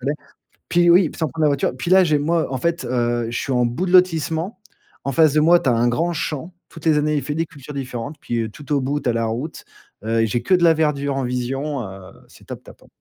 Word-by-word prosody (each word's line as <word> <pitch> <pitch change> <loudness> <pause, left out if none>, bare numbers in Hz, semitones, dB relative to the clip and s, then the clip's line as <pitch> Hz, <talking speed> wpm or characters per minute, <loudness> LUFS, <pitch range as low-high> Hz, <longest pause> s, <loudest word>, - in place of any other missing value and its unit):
fallait. 140 +4 -1 0.6
Puis 175 0 +4
oui, 175 -1 +5
sans 160 - 0
prendre 160 +2 -3
la - - +5
voiture. 140 -1 +1
Puis 170 - -4
là, 190 0 +7
j'ai 150 -2 +2
moi, 165 +2 0
en - - -1
fait, 170 +6 -1
heu, 120 -1 0
je 120 - -3
suis - - -3
en 125 -1 +2
bout 120 +11 -2
de - - -2
lotissement, 180 +1 +2 0.4
en 140 - -2
face 155 +1 +4
de 155 - +3
moi, 170 +2 +5
tu - - -4
as - - +3
un 120 +1 +2
grand 165 +8 0
champ, 160 +2 -4 0.2
toutes 165 0 -13
les 155 -2 +4
années, 150 0 +1
il 145 - 0
fait 145 +2 -4
des 165 +1 0
cultures 145 -1 -12
différentes, 135 +1 -5
puis 115 -2 -2
tout 145 +5 -12
au 145 - +3
bout, 140 +3 -1
tu 125 - -1
as - - +1
la 115 0 0
route, 120 +8 -5 0.4
heu, 115 0 +1
j'ai 120 +2 -1
que 185 - +1
de 180 - +4
la 165 -1 +6
verdure 145 -3 0
en 135 - -1
vision, 130 +3 -3
heu, 95 -1 -10 0.2
c'est - - -18
top-top - - -11
ouais. - - -20
145 Hz, 265 wpm, -21 LUFS, 125-165 Hz, 0.6 s, là